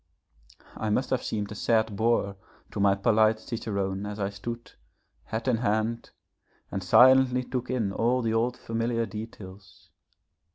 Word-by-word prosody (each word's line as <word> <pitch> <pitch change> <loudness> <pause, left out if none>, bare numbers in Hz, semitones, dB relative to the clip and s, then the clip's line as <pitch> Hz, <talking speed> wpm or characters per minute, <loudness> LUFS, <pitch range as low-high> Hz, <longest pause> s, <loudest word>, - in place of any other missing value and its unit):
I 110 - -3
must 125 +5 0
have 130 -1 +1
seemed 105 -2 -3
a - - -4
sad 110 0 +1
boor 110 -2 +1 0.4
to - - -5
my 100 -1 +4
polite 110 +1 +3
cicerone 100 -4 -3
as 105 +1 -6
I 100 0 -1
stood, 115 +4 -7 0.5
hat 110 +3 -4
in 125 -3 +3
hand, 110 +1 -1 0.6
and 95 - -3
silently 125 +5 +6
took 125 0 -4
in 110 -6 -1
all 120 +4 +1
the 110 -1 0
old 120 +2 0
familiar 115 0 -1
details. 100 -4 -10
110 Hz, 150 wpm, -27 LUFS, 100-120 Hz, 0.6 s, silently